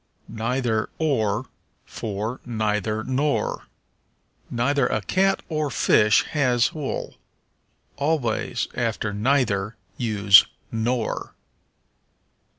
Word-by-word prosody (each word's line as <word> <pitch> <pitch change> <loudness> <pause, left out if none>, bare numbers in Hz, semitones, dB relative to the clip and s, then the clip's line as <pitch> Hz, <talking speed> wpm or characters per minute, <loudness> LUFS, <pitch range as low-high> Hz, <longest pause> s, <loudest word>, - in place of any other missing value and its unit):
Neither 115 0 -1
or 115 -7 0 0.4
for 110 +3 -4
Neither 110 -2 -1
nor. 140 +4 -1 0.8
"Neither 125 +2 +1
a - - 0
cat 195 - +1
or 155 -2 -1
fish 105 -5 +4
has 125 -5 +2
wool." 150 -4 -4 0.8
Always 140 -6 -1
after 105 -2 -2
neither 110 -3 +1 0.2
use 100 -4 +6 0.2
nor. 115 +1 -2
115 Hz, 80 wpm, -24 LUFS, 110-140 Hz, 0.8 s, use